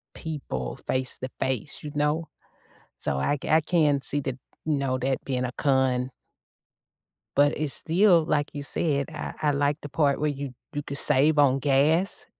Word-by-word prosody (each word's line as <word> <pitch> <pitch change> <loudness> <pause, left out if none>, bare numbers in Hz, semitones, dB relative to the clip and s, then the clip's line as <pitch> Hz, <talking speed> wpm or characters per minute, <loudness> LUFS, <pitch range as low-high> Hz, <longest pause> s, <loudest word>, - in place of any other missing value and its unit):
people 100 - -5
face 130 0 +1
to 130 - -5
face, 130 +3 -1
you 150 - -6
know? 150 +2 0 0.7
So 70 - -2
I 145 - 0
c - - -5
I 160 +1 +5
can 150 -5 +2
see 145 - +1
that, 130 -2 -3 0.3
you 155 -2 +1
know, 130 -2 -1
that 130 +1 -2
being 125 -2 -1
a 125 - -3
con. 130 -2 +1 1.3
But 145 +1 +4
it's 150 -2 +3
still, 175 -1 +4
like 150 -2 0
you 145 -1 -5
said, 140 -1 -1
I 150 - -5
I 150 -1 +2
like 145 +1 +1
the 145 - -8
part 140 -1 +1
where 150 0 +1
you 140 -2 -5 0.2
you 145 0 -3
could 140 - -5
save 150 +3 +3
on 135 -2 +4
gas 150 - +2
145 Hz, 180 wpm, -26 LUFS, 130-150 Hz, 1.3 s, I